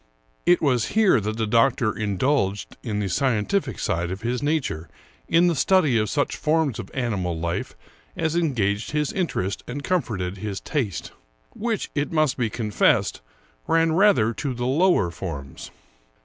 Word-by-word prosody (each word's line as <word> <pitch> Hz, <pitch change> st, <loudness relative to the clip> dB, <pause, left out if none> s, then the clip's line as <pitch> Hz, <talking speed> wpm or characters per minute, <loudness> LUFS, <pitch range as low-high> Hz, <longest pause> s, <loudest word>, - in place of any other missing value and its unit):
It 175 Hz, -1 st, +4 dB
was 125 Hz, -6 st, +2 dB
here 210 Hz, -, +5 dB
that 110 Hz, +2 st, -3 dB
the 110 Hz, -, 0 dB
doctor 115 Hz, +1 st, +2 dB
indulged 105 Hz, 0 st, 0 dB
the 105 Hz, -4 st, -2 dB
scientific 130 Hz, -, 0 dB
side 85 Hz, +1 st, -1 dB
of 95 Hz, +3 st, -5 dB
his 120 Hz, +2 st, -1 dB
nature 145 Hz, -, -1 dB, 0.4 s
in 170 Hz, +1 st, +4 dB
the 175 Hz, -, +3 dB
study 155 Hz, -2 st, +3 dB
of 105 Hz, -1 st, 0 dB
such 145 Hz, +5 st, 0 dB
forms 155 Hz, -5 st, +1 dB
of 95 Hz, -, -6 dB
animal 95 Hz, -10 st, -1 dB
life 85 Hz, +1 st, -3 dB, 0.4 s
as 160 Hz, 0 st, 0 dB
engaged 115 Hz, -, 0 dB
his 150 Hz, -1 st, 0 dB
interest 110 Hz, -, -2 dB
and 145 Hz, -, -5 dB
comforted 105 Hz, -, -1 dB
his 100 Hz, -1 st, -4 dB
taste 120 Hz, -, -3 dB, 0.2 s
— -, -, -40 dB
which, 225 Hz, -2 st, -2 dB
it 145 Hz, 0 st, -1 dB
must 155 Hz, -5 st, +2 dB
be 120 Hz, -4 st, -1 dB
confessed, 105 Hz, -3 st, +1 dB, 0.5 s
ran 165 Hz, 0 st, +3 dB
rather 165 Hz, -, +4 dB
to 135 Hz, +1 st, -3 dB
the 120 Hz, +1 st, -3 dB
lower 145 Hz, -, +3 dB
forms. 70 Hz, -7 st, -7 dB
125 Hz, 155 wpm, -24 LUFS, 100-155 Hz, 0.5 s, here